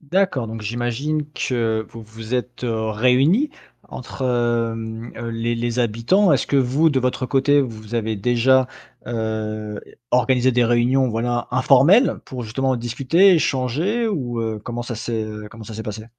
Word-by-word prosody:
D'accord, 155 Hz, -5 st, 0 dB
donc 110 Hz, 0 st, -6 dB
j'imagine 120 Hz, +7 st, -2 dB
que 115 Hz, -5 st, -1 dB
vous 115 Hz, -, -10 dB
vous 110 Hz, +2 st, -7 dB
êtes, 125 Hz, 0 st, -3 dB
heu, 110 Hz, -2 st, -1 dB
réunis 135 Hz, -, +3 dB, 0.4 s
entre -, -, -8 dB
hem, 115 Hz, -2 st, -1 dB
heu, 115 Hz, 0 st, -5 dB
les 115 Hz, +1 st, -2 dB
les 120 Hz, +1 st, -2 dB
habitants. 120 Hz, -, +2 dB
Est-ce 135 Hz, -, +1 dB
que 140 Hz, -, +1 dB
vous, 135 Hz, +5 st, +3 dB
de 135 Hz, -3 st, +1 dB
votre 130 Hz, +1 st, -1 dB
côté, 140 Hz, +2 st, +3 dB
vous 110 Hz, -3 st, -7 dB
avez 110 Hz, -1 st, -1 dB
déjà, 125 Hz, +4 st, +3 dB, 0.4 s
heu, 110 Hz, -2 st, -3 dB, 0.3 s
organisé 125 Hz, +1 st, +3 dB
des 120 Hz, 0 st, +3 dB
réunions 120 Hz, +3 st, +2 dB
voilà 120 Hz, +1 st, -2 dB
informelles 145 Hz, -, +5 dB
pour 130 Hz, -2 st, -6 dB
justement 130 Hz, +4 st, -1 dB
discuter, 135 Hz, -, +3 dB
échanger 160 Hz, -, 0 dB
ou 125 Hz, -, -2 dB
heu, 110 Hz, -1 st, -3 dB
comment 120 Hz, +1 st, -5 dB
ça 120 Hz, 0 st, -5 dB
s'est, 115 Hz, 0 st, -3 dB
heu, 105 Hz, 0 st, -8 dB
comment 115 Hz, -1 st, -11 dB
ça 110 Hz, -, -9 dB
s'est 110 Hz, -, -5 dB
passé? 110 Hz, 0 st, -6 dB
120 Hz, 165 wpm, -21 LUFS, 115-135 Hz, 0.4 s, informelles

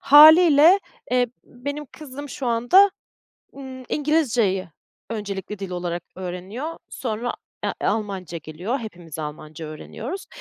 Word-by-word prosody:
hâliyle, 315 Hz, +4 st, +9 dB, 0.3 s
eee, 250 Hz, 0 st, +3 dB, 0.2 s
benim 285 Hz, +4 st, -6 dB
kızım 285 Hz, -1 st, -9 dB
şu 265 Hz, -, -5 dB
anda, 245 Hz, +13 st, +5 dB, 0.7 s
ııı, 260 Hz, -2 st, -8 dB
İngilizce'yi 245 Hz, -, +1 dB, 0.4 s
öncelikli 205 Hz, -2 st, -4 dB
dil 195 Hz, -1 st, -5 dB
olarak 175 Hz, -1 st, -3 dB
öğreniyor, 190 Hz, -, -5 dB
sonra, 240 Hz, 0 st, -3 dB, 0.5 s
e -, -, -1 dB
Almanca 195 Hz, -5 st, -2 dB
geliyor, 170 Hz, -, -4 dB
hepimiz 175 Hz, -, -8 dB
Almanca 155 Hz, +1 st, -6 dB
öğreniyoruz. 230 Hz, -, -7 dB
230 Hz, 110 wpm, -23 LUFS, 180-285 Hz, 0.7 s, hâliyle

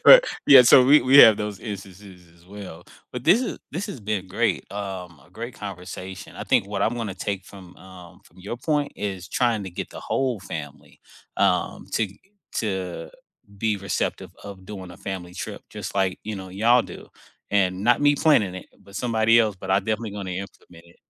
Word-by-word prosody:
Right, -, -, +10 dB, 0.2 s
yeah, 135 Hz, -3 st, +10 dB
so 125 Hz, +1 st, +7 dB
we 145 Hz, +3 st, +7 dB
we 135 Hz, +2 st, +6 dB
have 110 Hz, -6 st, +10 dB
those 105 Hz, -2 st, -5 dB
instances 95 Hz, -3 st, -9 dB
as 85 Hz, 0 st, -23 dB
well. 95 Hz, -3 st, -10 dB, 0.3 s
But 125 Hz, 0 st, -6 dB
this 175 Hz, +9 st, +5 dB
is 255 Hz, -, -4 dB
this 175 Hz, +7 st, -3 dB
has 160 Hz, -, -7 dB
been 105 Hz, -2 st, -3 dB
great, -, -, -1 dB
um, 95 Hz, -6 st, -6 dB
a -, -, -24 dB
great 115 Hz, +5 st, -7 dB
conversation. 95 Hz, -1 st, -8 dB
I -, -, -6 dB
think -, -, +2 dB
what 100 Hz, -1 st, -2 dB
I'm 115 Hz, -, +1 dB
gonna 115 Hz, -5 st, -4 dB
take 100 Hz, 0 st, -4 dB
from, 95 Hz, -3 st, -14 dB
um 90 Hz, -2 st, -14 dB
from -, -, -22 dB
your 100 Hz, +6 st, -6 dB
point 145 Hz, +1 st, -1 dB
is 95 Hz, -4 st, -5 dB
trying 120 Hz, -4 st, +1 dB
to 95 Hz, -, -7 dB
get -, -, -6 dB
the -, -, -9 dB
whole 130 Hz, -6 st, -1 dB
family, 80 Hz, -6 st, -9 dB, 0.4 s
um, -, -, 0 dB
to 110 Hz, -, +1 dB
g 100 Hz, +1 st, -18 dB, 0.4 s
to 95 Hz, -5 st, -3 dB, 0.5 s
be 110 Hz, 0 st, 0 dB
receptive 100 Hz, 0 st, -3 dB
of 100 Hz, -2 st, -10 dB
doing 95 Hz, -4 st, -8 dB
a 90 Hz, -, -12 dB
family 90 Hz, -2 st, -6 dB
trip -, -, -6 dB
just -, -, -7 dB
like, 95 Hz, -2 st, 0 dB
you 110 Hz, 0 st, -4 dB
know, 95 Hz, -1 st, -8 dB
y'all 115 Hz, +6 st, +3 dB
do. -, -, -11 dB, 0.4 s
And 95 Hz, -1 st, +1 dB
not 120 Hz, 0 st, +4 dB
me 145 Hz, 0 st, +4 dB
planning 115 Hz, -, +3 dB
it, -, -, -9 dB, 0.2 s
but 100 Hz, 0 st, -12 dB
somebody 115 Hz, +1 st, +3 dB
else, 110 Hz, -4 st, +2 dB
but 95 Hz, +1 st, -7 dB
I'm 95 Hz, +1 st, +2 dB
definitely 110 Hz, 0 st, -2 dB
gonna 100 Hz, -2 st, -5 dB
implement 85 Hz, -3 st, -18 dB
it. 85 Hz, -, -21 dB
100 Hz, 200 wpm, -24 LUFS, 95-115 Hz, 0.5 s, Right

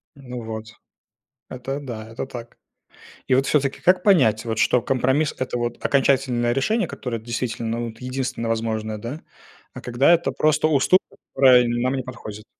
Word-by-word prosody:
Ну 125 Hz, -3 st, -8 dB
вот, 110 Hz, 0 st, -6 dB, 0.9 s
это 130 Hz, +2 st, -5 dB
да, 110 Hz, -5 st, -7 dB
это 115 Hz, +3 st, -5 dB
так. 120 Hz, -2 st, -9 dB, 0.7 s
И 130 Hz, -, +4 dB
вот 135 Hz, +1 st, +2 dB
всё-таки 140 Hz, -2 st, 0 dB
как 180 Hz, 0 st, +3 dB
понять, 130 Hz, -, +4 dB
вот 115 Hz, -1 st, -3 dB
что 120 Hz, +1 st, +3 dB
компромисс 135 Hz, +5 st, +1 dB
это 130 Hz, -1 st, -3 dB
вот 120 Hz, 0 st, -3 dB
окончательное 130 Hz, -3 st, +2 dB
решение, 215 Hz, -, 0 dB
которое 120 Hz, -3 st, -5 dB
действительно, 115 Hz, 0 st, -3 dB
вот, 115 Hz, 0 st, -10 dB
единственное 125 Hz, -2 st, -3 dB
возможное, 110 Hz, -1 st, -2 dB
да? 125 Hz, +9 st, -6 dB, 0.5 s
А -, -, -7 dB
когда 125 Hz, +6 st, +3 dB
это 170 Hz, 0 st, +2 dB
просто 155 Hz, 0 st, +2 dB
уступ 155 Hz, +5 st, +4 dB, 0.4 s
которая 130 Hz, -2 st, +6 dB
нам 120 Hz, +2 st, 0 dB
не 130 Hz, -, -2 dB
подходит. 110 Hz, -4 st, -9 dB
125 Hz, 155 wpm, -22 LUFS, 115-135 Hz, 0.9 s, которая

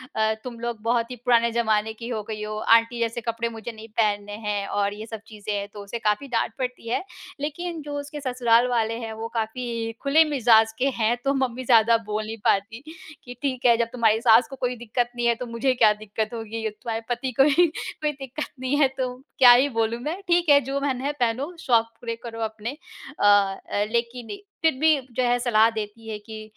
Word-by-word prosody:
अ, 220 Hz, 0 st, +2 dB
तुम 240 Hz, -2 st, -7 dB
लोग 235 Hz, -2 st, -4 dB
बहुत 235 Hz, +1 st, 0 dB
ही -, -, -4 dB
पुराने 235 Hz, -1 st, +4 dB
ज़माने 220 Hz, -2 st, +1 dB
की 230 Hz, +1 st, -8 dB
हो 225 Hz, -3 st, -2 dB
गई 215 Hz, 0 st, -6 dB
हो, 215 Hz, 0 st, -4 dB
आंटी 230 Hz, +2 st, +3 dB
जैसे 230 Hz, 0 st, -1 dB
कपड़े 230 Hz, 0 st, -2 dB
मुझे 225 Hz, 0 st, -7 dB
नहीं 220 Hz, 0 st, -11 dB
पहनने 205 Hz, -1 st, -1 dB
हैं 205 Hz, -1 st, -1 dB
और 205 Hz, 0 st, 0 dB
ये 215 Hz, +1 st, -8 dB
सब 225 Hz, -1 st, -7 dB
चीज़ें 210 Hz, -1 st, -6 dB
हैं, 200 Hz, 0 st, -2 dB
तो 205 Hz, -, -8 dB
उसे 215 Hz, +4 st, -6 dB
काफ़ी 210 Hz, +5 st, 0 dB
डाँट 235 Hz, -2 st, 0 dB
पड़ती 250 Hz, -2 st, -4 dB
है। 245 Hz, -, 0 dB, 0.4 s
लेकिन 320 Hz, +3 st, -4 dB
जो 290 Hz, 0 st, -5 dB
उसके 285 Hz, +1 st, -7 dB
ससुराल 245 Hz, -2 st, +3 dB
वाले 230 Hz, -2 st, 0 dB
हैं, 225 Hz, -2 st, -5 dB
वो 220 Hz, +1 st, -5 dB
काफ़ी 230 Hz, 0 st, -3 dB
खुले 285 Hz, +4 st, +5 dB
मिज़ाज़ 225 Hz, -4 st, +5 dB
के 270 Hz, -, +2 dB
हैं, 225 Hz, +2 st, +2 dB
तो 275 Hz, -, +3 dB
मम्मी 255 Hz, -2 st, -1 dB
ज़्यादा 230 Hz, -1 st, +5 dB
बोल 215 Hz, +1 st, -2 dB
नहीं 220 Hz, +1 st, -6 dB
पाती 225 Hz, +6 st, 0 dB, 0.4 s
कि 245 Hz, -, -8 dB
ठीक 260 Hz, -3 st, -2 dB
है 235 Hz, -1 st, +6 dB
जब 235 Hz, 0 st, +1 dB
तुम्हारी 225 Hz, -2 st, +2 dB
सास 230 Hz, +1 st, +6 dB
को 270 Hz, -, -7 dB
कोई 250 Hz, -1 st, -2 dB
दिक्कत 240 Hz, +1 st, -2 dB
नहीं 240 Hz, 0 st, 0 dB
है, 235 Hz, -, +3 dB
तो 250 Hz, -, -6 dB
मुझे 235 Hz, +3 st, 0 dB
क्या 220 Hz, -4 st, +5 dB
दिक्कत 215 Hz, +1 st, -4 dB
होगी, 225 Hz, -1 st, -5 dB, 0.2 s
तुम्हारे 225 Hz, +1 st, -5 dB
पति 245 Hz, +2 st, -2 dB
को -, -, +9 dB
ही 330 Hz, +5 st, +5 dB
कोई 305 Hz, -1 st, -4 dB
दिक्कत 275 Hz, +1 st, -6 dB
नहीं 260 Hz, +2 st, -1 dB
है, 285 Hz, -, +6 dB
तो 255 Hz, -1 st, -1 dB, 0.3 s
क्या 250 Hz, -2 st, +10 dB
ही 250 Hz, +3 st, +6 dB
बोलूँ 225 Hz, -1 st, -1 dB
मैं 315 Hz, +8 st, -3 dB
ठीक 345 Hz, -1 st, +2 dB
है 285 Hz, -1 st, +8 dB
जो 275 Hz, +2 st, -3 dB
मन 265 Hz, -3 st, -1 dB
है 280 Hz, +2 st, -1 dB
पहनो, 255 Hz, +8 st, -1 dB
शौक 230 Hz, -6 st, +3 dB, 0.2 s
पूरे 230 Hz, -1 st, -3 dB
करो 230 Hz, -1 st, -7 dB
अपने। 220 Hz, +1 st, -4 dB, 0.5 s
अ -, -, +2 dB
अ, 205 Hz, 0 st, +3 dB
लेकिन 240 Hz, -, -7 dB, 0.2 s
फिर 320 Hz, -1 st, +4 dB
भी 315 Hz, 0 st, +5 dB, 0.2 s
जो 255 Hz, -, +1 dB
है 245 Hz, 0 st, +3 dB
सलाह 225 Hz, -2 st, +4 dB
देती 220 Hz, +1 st, -6 dB
है 215 Hz, -, -3 dB
कि 215 Hz, +1 st, -9 dB
235 Hz, 220 wpm, -24 LUFS, 220-255 Hz, 0.5 s, क्या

